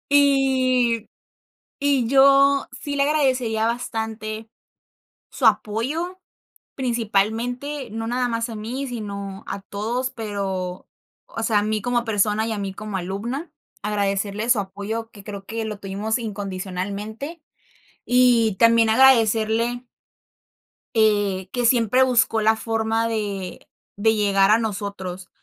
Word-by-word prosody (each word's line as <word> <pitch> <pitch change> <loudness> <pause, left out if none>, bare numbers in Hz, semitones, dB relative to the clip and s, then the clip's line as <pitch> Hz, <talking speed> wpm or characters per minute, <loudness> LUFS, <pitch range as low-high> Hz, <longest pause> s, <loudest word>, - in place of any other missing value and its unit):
Y 260 -5 +3 0.7
y 275 -4 +2
yo 275 +1 +5
sí 285 -1 -3
le 280 - +1
agradecería 255 -7 +1
bastante 220 -2 -4 0.8
su - - 0
apoyo, 305 - 0 0.6
principalmente, 245 +3 -1
no 225 +1 -4
nada 245 +1 0
más 230 0 -2
a - - -6
mí, 245 +6 -4
sino 200 -4 -6
a 195 0 -5
todos, 235 +6 -3
pero, 195 -4 -4 0.4
o - - -6
sea, 220 -2 +3
a - - -2
mí 215 -1 -1
como 240 0 0
persona 215 0 +1
y 225 - -2
a 215 - -3
mí 195 -1 -3
como 210 -1 -5
alumna, 230 - -4 0.3
agradecerle 205 +1 -1
su 235 -4 +4
apoyo, 205 +4 -5
que 200 -3 -14
creo 200 -2 -7
que 225 0 -4
lo 210 -1 -5
tuvimos 205 +3 -2
incondicionalmente. 205 - -5 0.6
Y 245 -4 +4
también 230 -1 +5
agradecerle. 230 -1 +3 1.1
Eh, 205 -4 +2
que 245 -1 0
siempre 240 +1 +4
buscó 235 -3 +2
la 220 +1 +4
forma 225 0 -1
de 200 -5 -4 0.3
de 220 +2 +3
llegar 200 -2 +3
a 220 - +6
nosotros, 195 -4 -4
225 Hz, 125 wpm, -23 LUFS, 205-245 Hz, 1.1 s, a